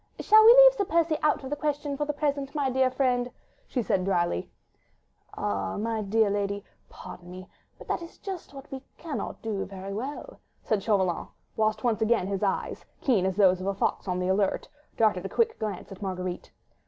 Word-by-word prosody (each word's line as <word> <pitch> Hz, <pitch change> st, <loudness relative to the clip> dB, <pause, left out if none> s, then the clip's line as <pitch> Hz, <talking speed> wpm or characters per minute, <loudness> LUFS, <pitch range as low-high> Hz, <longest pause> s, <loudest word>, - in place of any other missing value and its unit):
"Shall 435 Hz, +1 st, +7 dB
we 450 Hz, -, +10 dB
leave -, -, +9 dB
Sir 410 Hz, -5 st, -1 dB
Percy 330 Hz, -2 st, +2 dB
out 300 Hz, -1 st, +2 dB
of 265 Hz, -, -7 dB
the -, -, +1 dB
question 290 Hz, -1 st, -2 dB
for 295 Hz, +1 st, -1 dB
the 295 Hz, -, -1 dB
present, 285 Hz, -1 st, -2 dB
my 280 Hz, -3 st, +1 dB
dear 260 Hz, 0 st, +3 dB
friend?" 250 Hz, -2 st, +1 dB, 0.4 s
she 250 Hz, -, -1 dB
said 190 Hz, -3 st, +1 dB
drily. 175 Hz, -, 0 dB, 0.9 s
"Ah! 95 Hz, -2 st, -2 dB
my 225 Hz, +1 st, -1 dB
dear 210 Hz, +1 st, +2 dB
lady, 200 Hz, 0 st, -1 dB, 0.3 s
pardon 175 Hz, 0 st, -11 dB
me, 185 Hz, +1 st, -9 dB, 0.3 s
but -, -, -13 dB
that -, -, -1 dB
is 335 Hz, -, -10 dB
just 380 Hz, -4 st, -7 dB
what 275 Hz, 0 st, -12 dB
we 265 Hz, -1 st, -5 dB, 0.2 s
cannot 320 Hz, -4 st, -5 dB
very 195 Hz, -2 st, -4 dB
well 260 Hz, +8 st, -4 dB
do," -, -, -14 dB, 0.3 s
said 215 Hz, -3 st, 0 dB
Chauvelin, 190 Hz, -5 st, +1 dB, 0.3 s
whilst 215 Hz, 0 st, 0 dB
once 230 Hz, -2 st, +1 dB
again 220 Hz, -3 st, +2 dB
his 195 Hz, 0 st, -3 dB
eyes, 200 Hz, -2 st, -1 dB, 0.2 s
keen 210 Hz, -9 st, +2 dB
as 190 Hz, -, -1 dB
those 185 Hz, -2 st, +4 dB
of 190 Hz, -, -4 dB
a 195 Hz, -, 0 dB
fox 195 Hz, -, -1 dB
on 180 Hz, -1 st, -1 dB
the 180 Hz, 0 st, -1 dB
alert, 195 Hz, +1 st, +1 dB, 0.3 s
darted 210 Hz, -5 st, +2 dB
a 195 Hz, -, -4 dB
quick 455 Hz, -1 st, +1 dB
glance 205 Hz, -4 st, -4 dB
at 195 Hz, -, -10 dB
Marguerite. 185 Hz, -2 st, -4 dB
220 Hz, 200 wpm, -27 LUFS, 190-285 Hz, 0.9 s, we